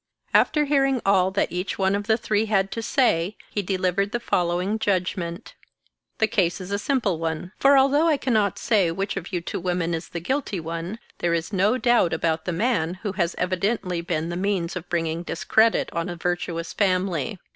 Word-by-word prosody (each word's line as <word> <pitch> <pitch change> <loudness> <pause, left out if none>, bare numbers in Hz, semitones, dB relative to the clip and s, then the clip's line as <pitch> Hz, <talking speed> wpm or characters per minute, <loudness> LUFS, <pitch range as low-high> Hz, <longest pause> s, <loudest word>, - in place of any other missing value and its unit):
After 300 -1 +4
hearing 275 -2 +2
all 190 -2 +4
that 190 -2 0
each 180 +3 -3
one 190 0 +2
of 205 +1 -2
the 220 -1 +3
three 215 -1 0
had 195 -2 +1
to 230 - -3
say, 215 -6 +1
he 205 - -1
delivered 195 +1 0
the 240 - 0
following 180 +1 0
judgment: 180 -2 -2 0.6
The 220 - +3
case 195 -5 0
is 185 +1 -7
a 200 - 0
simple 210 - 0
one; 165 +2 -3
for 275 0 +6
although 280 +4 +4
I 310 -3 +3
cannot 220 -7 +1
say 210 -6 +2
which 195 +5 -2
of 195 -1 -6
you 175 -3 -1
two - - -4
women 175 -1 -1
is 165 0 -4
the 170 - -4
guilty 215 - -2
one, 165 +5 -5 0.2
there 170 -1 +1
is 170 +5 -3
no 200 +6 +3
doubt 240 -9 +3
about 160 0 -1
the 180 - -1
man, 180 -3 0
who 205 - -1
has 175 -2 -1
evidently 185 -1 -1
been 165 -1 -2
the 175 - -3
means 190 -3 -1
of 180 -1 -6
bring 170 -2 0
ing 160 +1 -3
discredit 220 +6 +2
on 170 +1 -2
a 175 - -4
virtuous 170 -1 -3
family. 185 -7 0
185 Hz, 200 wpm, -24 LUFS, 170-215 Hz, 0.6 s, for